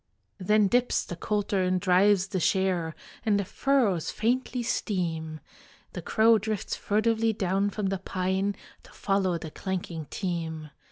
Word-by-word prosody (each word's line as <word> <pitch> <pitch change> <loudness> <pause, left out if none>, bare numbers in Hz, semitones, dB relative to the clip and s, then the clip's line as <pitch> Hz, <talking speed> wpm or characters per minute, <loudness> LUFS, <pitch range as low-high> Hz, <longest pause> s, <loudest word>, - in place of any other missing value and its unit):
Then 210 +2 +3
dips 245 +4 +1
the 175 - -6
coulter 205 +1 -1
and 185 0 +1
drives 190 +1 +3
the 190 - -1
share, 180 -2 +1 0.3
And 210 -3 +2
the 200 - -1
furrows 215 - +1
faintly 245 +2 -1
steam. 165 -8 -2 0.5
The - - -5
crow 225 0 +4
drifts 215 -1 -3
furtively 220 +1 +1
down 195 0 0
from 200 -1 -2
the 195 -1 -2
pine 190 +2 -1 0.3
To - - -18
follow 195 -3 0
the 160 -1 -8
clanking 175 -4 -4
team. 160 -5 -4
195 Hz, 145 wpm, -27 LUFS, 180-215 Hz, 0.5 s, crow